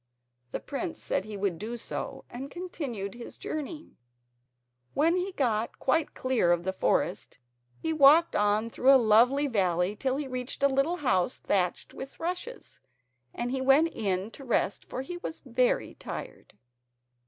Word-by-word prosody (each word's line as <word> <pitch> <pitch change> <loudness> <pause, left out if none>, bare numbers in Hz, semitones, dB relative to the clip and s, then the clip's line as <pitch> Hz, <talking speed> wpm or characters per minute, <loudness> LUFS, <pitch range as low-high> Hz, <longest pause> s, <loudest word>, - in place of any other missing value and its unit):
The - - -3
prince 325 +4 -5
said 190 - -1
he 215 -1 -6
would 195 -4 -1
do 230 +4 -4
so, - - -6
and 265 +3 -7
continued 275 - -5
his 235 0 -10
journey. 310 +1 -6 1.0
When 325 +4 +3
he 365 +2 -1
got 230 -6 0
quite 305 +4 0
clear 255 -9 +2
of 175 0 +2
the 190 +1 -1
forest - - 0 0.4
he 320 - -2
walked 310 +3 +6
on 210 +2 +2
through 260 +4 +4
a - - +9
lovely 245 +7 +5
valley 185 -5 +1
till 260 +4 -1
he 290 -1 -3
reached 255 +1 -5
a - - +8
little 275 +5 +1
house 185 0 +2
thatched 180 -3 -1
with 270 - -9
rushes, 360 +9 -5 0.5
and 240 +1 -3
he 265 0 -1
went 280 +5 +4
in 195 0 -1
to 275 - -11
rest 235 -5 0
for 255 - -5
he 350 +6 -6
was 340 -2 -7
very - - +1
tired. - - -8
260 Hz, 160 wpm, -29 LUFS, 210-305 Hz, 1.0 s, a